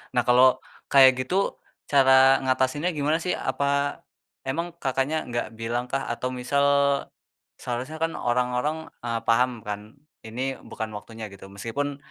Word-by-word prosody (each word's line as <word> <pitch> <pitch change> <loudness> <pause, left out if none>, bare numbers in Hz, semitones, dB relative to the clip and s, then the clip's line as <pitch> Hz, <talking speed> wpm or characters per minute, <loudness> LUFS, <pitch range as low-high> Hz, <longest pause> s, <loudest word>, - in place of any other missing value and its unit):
Nah 125 - +4
kalau 130 +1 +6 0.3
kayak 130 -2 +7
gitu, 185 +10 0 0.3
cara 135 -1 +6
ngatasinnya 130 +6 +1
gimana 150 +2 +1
sih? 180 +2 -1
Apa, 140 0 -1 0.5
emang 170 +6 -2
Kakaknya 135 +3 -1
gak 120 -2 -2
bilang 120 +2 -2
kah 135 - -1
atau 125 +2 -3
misal— 140 +2 +1 0.5
seharusnya 125 +6 -4
kan 165 +1 -1
orang-orang, 125 +6 -1 0.2
eee, 115 -1 -2
paham 120 -1 +1
kan, 105 +3 -7 0.2
ini 130 +4 -4
bukan 110 -1 -6
waktunya 110 +2 -8
gitu, 95 0 -12
meskipun 125 +9 -4
130 Hz, 135 wpm, -25 LUFS, 120-140 Hz, 0.5 s, kayak